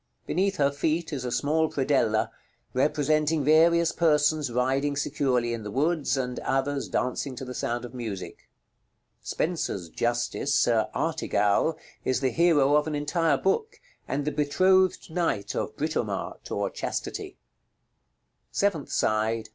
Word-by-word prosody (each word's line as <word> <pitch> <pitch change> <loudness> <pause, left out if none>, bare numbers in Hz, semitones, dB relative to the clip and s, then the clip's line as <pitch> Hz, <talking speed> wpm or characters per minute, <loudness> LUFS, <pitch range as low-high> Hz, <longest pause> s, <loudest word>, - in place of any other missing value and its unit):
Beneath 195 +2 0
her 140 -3 +2
feet 160 +3 -1
is 135 -3 -3
a 125 - -2
small 155 +5 +1
predella, 115 -6 +1 0.4
representing 150 +2 +1
various 165 +3 +5
persons 150 -3 +2
riding 135 +4 +1
securely 130 -4 0
in 115 - -4
the 105 - -6
woods, 150 +4 0
and 125 -1 -2
others 135 +1 -1
dancing 130 +1 -2
to 130 - -6
the 125 - -6
sound 120 0 -2
of 120 - -10
music. 110 -7 -7 0.7
Spenser's 150 - -2
Justice, 120 - -1
Sir 115 -6 +2
Artegall, 105 +10 +1 0.3
is 130 - +1
the 130 -1 0
hero 150 -4 +4
of 150 +1 +2
an 155 - -2
entire 150 +1 +1
book, 445 - -1 0.3
and 140 +1 -2
the 150 - 0
betrothed 185 +6 +2
knight 160 - -1
of - - -3
Britomart, - - -3
or - - -2
chastity. - - -4 1.2
§ - - -3
LXXXIV. 200 0 +4
_Seventh 155 -4 -8
side. 110 +1 0
145 Hz, 140 wpm, -27 LUFS, 125-160 Hz, 1.2 s, various